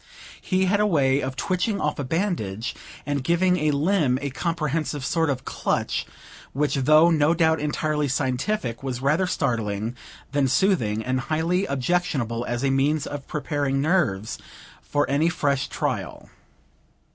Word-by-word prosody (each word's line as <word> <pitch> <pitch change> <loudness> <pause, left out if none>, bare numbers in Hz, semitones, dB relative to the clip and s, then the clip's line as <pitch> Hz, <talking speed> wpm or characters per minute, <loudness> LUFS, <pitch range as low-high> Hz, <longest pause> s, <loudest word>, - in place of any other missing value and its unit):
He 185 0 +1
had 200 +2 +2
a 210 - +3
way 140 -6 +2
of 130 0 -3
twitching 190 - -1
off 150 -3 -1
a - - -1
bandage, 125 - -2 0.3
and 145 -2 -1
giving 180 +3 +2
a 155 -2 +1
limb 150 -2 +2
a 140 -1 -4
comprehensive 155 -2 -2
sort 165 -1 +1
of 130 -3 -2
clutch, - - -1 0.5
which 145 +2 0
though 155 +5 +5
no 155 +1 +3
doubt 160 -1 +3
entirely 150 0 -1
scientific, 130 - -1
was 130 -3 -3
rather 150 +8 +2
startling 115 - -1 0.4
than 140 -1 +2
soothing, 125 - +1
and 130 0 0
highly 170 +5 +1
objectionable 135 -5 -1
as 120 +2 -2
a 135 - +2
means 145 +3 +1
of 145 -1 -6
preparing 145 -3 -1
nerves 140 - 0 0.4
for 145 0 0
any 145 +4 +2
fresh 140 -4 0
trial. - - -4
145 Hz, 145 wpm, -24 LUFS, 130-165 Hz, 0.5 s, though